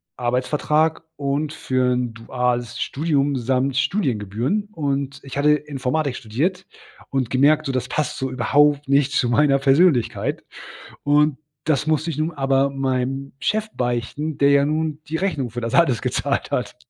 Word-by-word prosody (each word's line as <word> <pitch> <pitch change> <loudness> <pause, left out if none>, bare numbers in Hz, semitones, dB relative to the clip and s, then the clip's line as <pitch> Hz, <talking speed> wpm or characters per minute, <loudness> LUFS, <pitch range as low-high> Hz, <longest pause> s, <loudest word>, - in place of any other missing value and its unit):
Arbeitsvertrag 150 +6 0
und 145 +2 -2
für 130 -4 0
'n 125 -2 -2
duales 120 +1 -2
Studium 145 -2 0
samt 130 +2 0
Studiengebühren. 135 - -1
Und 140 -3 -2
ich 135 0 -7
hatte 150 +1 +5
Informatik 145 -1 -2
studiert 155 - -2 0.4
und 130 -4 -1
gemerkt, 150 +4 +3
so: 135 - -1
„Das 130 -1 -2
passt 145 +2 -2
so 130 - -2
überhaupt 145 +3 +2
nicht 140 0 +3
zu 130 -3 +1
meiner 140 +3 +3
Persönlichkeit.“ 140 -1 +2 0.6
Und 145 0 +3 0.3
das 150 -1 0
musste 155 +1 +1
ich 155 - -6
nun 155 +2 0
aber 135 -2 +1
meinem 135 0 -2
Chef 215 0 -1
beichten, 125 +5 -2
der 140 0 +4
ja 140 0 +4
nun 155 0 -1
die 160 +2 -2
Rechnung 150 -10 -1
für 120 +2 -6
das 115 0 -3
alles 135 -10 +3
gezahlt - - -1
hat. - - -2
140 Hz, 155 wpm, -22 LUFS, 125-150 Hz, 0.6 s, hatte